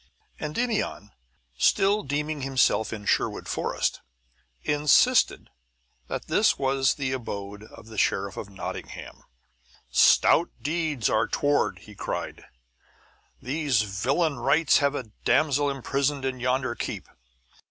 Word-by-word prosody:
Endymion, 200 - -2 0.5
still 200 +2 +3
deeming 150 0 -3
himself 130 -5 +2
in 105 -2 -6
Sherwood - - 0
Forest, - - -2 0.6
insisted 150 - +3 0.6
that - - -4
this - - +2
was 135 0 +1
the 135 -3 -2
abode 105 -5 -5
of 110 - -14
the 110 -1 -6
Sheriff 100 0 0
of 100 - -7
Nottingham. 95 -1 -8 0.7
"Stout - - +5
deeds 155 -6 -1
are 110 +1 +2
toward!" 145 0 +1
he - - -13
cried. - - -5 1.0
"These 135 -4 +1
villain 135 - -1
wights 155 +3 +4
have 140 0 +1
a 120 -6 -6
damsel 145 -1 +2
imprisoned 140 +1 -1
in 130 -1 -2
yonder 130 +1 0
keep!" - - -5
135 Hz, 115 wpm, -26 LUFS, 115-150 Hz, 1.0 s, Stout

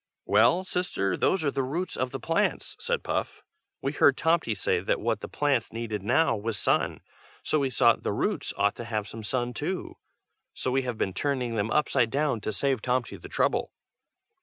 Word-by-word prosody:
"Well, 115 - +4
sister, 180 - -1
those 190 -4 +1
are 140 - +2
the 135 - -1
roots 160 +8 -2
of 130 - -1
the 135 - -5
plants," 165 - 0
said 480 0 -1
Puff. - - -3 0.4
"We 135 - 0
heard 140 -2 +4
Tomty 160 -9 +2
say 95 - +1
that - - 0
what - - 0
the - - -6
plants 140 -6 0
needed 115 -3 -4
now 115 +6 +3
was 110 0 -3
sun, - - +2
and - - -17 0.4
so 155 - +1
we 135 -2 +1
thought 115 -2 +4
the - - -1
roots 145 - -1
ought 100 +1 +2
to 120 - -6
have 110 -2 -2
some 115 - -8
sun 120 +3 -1
too. 170 +10 -4 0.6
So 130 - -2
we 135 +1 +2
have 125 -3 -4
been 95 - -1
turning 125 +1 -1
them 110 -1 0
upside 130 -4 +2
down 140 -3 0
to 110 - -2
save 130 +5 0
Tomty 125 +1 -1
the - - -11
trouble." - - 0
130 Hz, 200 wpm, -27 LUFS, 110-150 Hz, 0.6 s, Well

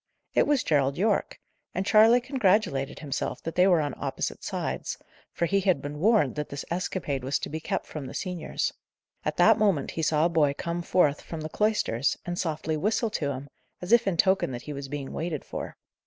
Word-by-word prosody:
It - - +3
was 285 -4 +2
Gerald 140 -3 +2
Yorke: 205 +2 0 0.4
and 185 +2 -1
Charley 225 +4 +6
congratulated 205 - +1
himself 145 -3 -4
that 165 - -4
they 180 +1 +4
were 175 -3 +5
on 145 -3 -2
opposite - - -3
sides; - - -3 0.3
for 170 - -1
he 200 +3 +2
had 185 -6 +2
been 145 +1 -6
warned 200 - +3
that 150 0 -4
this 140 0 -6
escapade 170 -6 -2
was 135 +2 0
to - - -5
be 160 - -4
kept - - -3
from 145 -4 -7
the - - -8
seniors. 180 -3 -2 0.5
At - - -2
that - - +6
moment 195 -10 +2
he 165 - -3
saw 155 0 +2
a - - +5
boy 150 -4 +2
come 170 +1 -3
forth 155 -4 +2
from 165 -2 -7
the 155 - -5
cloisters, 210 - +1
and 175 0 -3
softly 160 -2 -1
whistle 215 +6 0
to 150 -9 -1
him, 135 0 -5 0.3
as 180 - -6
if 235 -2 +5
in 185 -3 +1
token 190 +3 +3
that 120 - -6
he 150 - -6
was 140 -1 -6
being 140 -1 -5
waited 160 -3 -3
for. - - -6
165 Hz, 210 wpm, -27 LUFS, 145-195 Hz, 0.5 s, Charley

